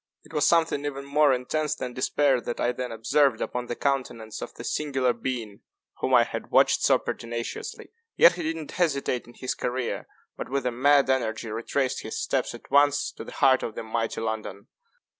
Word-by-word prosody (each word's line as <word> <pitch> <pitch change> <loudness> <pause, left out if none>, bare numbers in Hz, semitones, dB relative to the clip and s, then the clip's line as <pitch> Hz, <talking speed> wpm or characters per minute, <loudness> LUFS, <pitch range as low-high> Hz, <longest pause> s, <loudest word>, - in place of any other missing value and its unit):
It - - -17
was 150 -2 +3
something 165 -4 +2
even 140 -1 -4
more 145 +1 +4
intense 150 +4 -1
than 125 -4 -5
despair 130 0 +2
that 120 - -5
I 120 - +2
then 125 0 -5
observed 115 +2 +2
upon 125 0 -3
the 120 - -3
countenance 125 -6 -2
of - - -6
the - - -8
singular 135 -4 0
being 115 -3 -5 0.4
whom - - +2
I - - +7
had - - -6
watched - - +4
so - - +5
pertinaciously. 115 0 -5 0.3
Yet 170 - +8
he 175 - -5
did 160 0 -1
not 155 -3 -7
hesitate 140 -8 0
in 120 - -15
his 130 - -3
career, 125 0 -3 0.3
but, - - -6
with 135 -1 -1
a 125 - +1
mad 140 +3 +4
energy, 110 -3 -1
retraced 130 +4 -1
his 110 - -5
steps 130 -3 -1
at 120 - -15
once, 145 0 +4
to - - -9
the - - -10
heart 130 -2 +4
of 110 - -5
the - - -5
mighty 115 0 -2
London. 110 -3 -4
130 Hz, 195 wpm, -26 LUFS, 115-145 Hz, 0.4 s, Yet